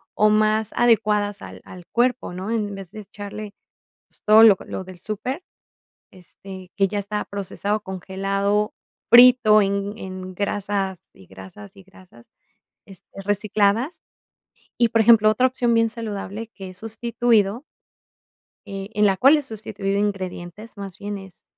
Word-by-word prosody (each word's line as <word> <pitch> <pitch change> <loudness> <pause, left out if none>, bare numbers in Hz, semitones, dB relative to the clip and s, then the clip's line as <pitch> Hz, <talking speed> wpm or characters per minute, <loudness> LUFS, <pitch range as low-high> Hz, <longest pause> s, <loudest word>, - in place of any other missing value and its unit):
o 215 - +4
más 215 0 +2
adecuadas 210 -3 +2
al - - -10
al 180 -1 -12
cuerpo, 245 -4 0
¿no? 190 +4 -5
En 210 -3 -2
vez 195 -3 -10
de 215 - -9
echarle, 205 0 -9 0.5
pues, - - -18
todo 215 +1 +7
lo 210 -4 +7
lo - - -6
del 185 -2 -12
súper, 235 - -5 0.7
este, 185 0 -13
que 195 -1 +2
ya 205 +1 -3
estaba 210 +1 -4
procesado, 200 +1 -3
congelado, 195 +2 -2 0.4
frito 240 -3 +7
en 200 +2 -2
en 185 -1 -8
grasas 200 -2 -2
y 95 - -18
grasas 95 +2 -13
y 195 - -14
grasas, 185 -10 -20 0.6
este, 195 0 -14
recicladas. 205 - 0 0.8
Y, 235 - +4
por 225 - +2
ejemplo, 220 -1 +6
otra 250 +4 +3
opción 245 -2 0
bien 230 0 +2
saludable 220 -1 -6
que 195 -4 -10
es 185 - -5
sustituido, 225 0 0 1.0
eh, 195 -1 -7
en 210 -1 +2
la 195 -1 +3
cual 275 +9 +6
he - - -2
sustituido 200 -4 -3
ingredientes, 195 +1 -5
más 195 -2 -8
bien 205 0 -5
es, 195 -2 -14
205 Hz, 145 wpm, -22 LUFS, 195-220 Hz, 1.0 s, todo